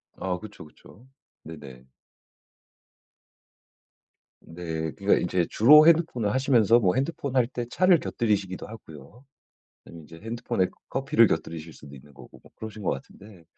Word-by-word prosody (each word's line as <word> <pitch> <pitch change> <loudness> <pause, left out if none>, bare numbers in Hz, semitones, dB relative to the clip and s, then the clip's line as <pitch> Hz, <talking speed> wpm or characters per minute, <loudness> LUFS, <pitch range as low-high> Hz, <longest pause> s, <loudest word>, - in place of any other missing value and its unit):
아 90 -1 -3
그쵸, 105 -2 -12
그쵸. 100 +9 -19 0.4
네네. 70 -5 -12 2.5
네. 80 -2 -6
그러니까 100 +1 +2
이제 90 0 0
주로 150 +7 +7
핸드폰을 155 -11 +2
하시면서 120 -3 +3
뭐 95 -6 +1
핸드폰 140 0 -3
할 125 -3 +3
때 120 -1 -5
차를 180 +4 +3
곁들이시기도 100 -5 -2
하고요. 105 - -14 0.6
그다음에 85 - -13
인제 80 +2 -14
핸드폰에 110 -4 -2 0.2
커피를 - - +3
곁들이실 80 0 -4
수도 70 -1 -14
있는 70 +2 -16
거고 70 - -16
뭐 - - -20
그러신 110 -1 -9
것 - - 0
같은데 95 +6 -10
100 Hz, 320 characters per minute, -25 LUFS, 80-120 Hz, 2.5 s, 주로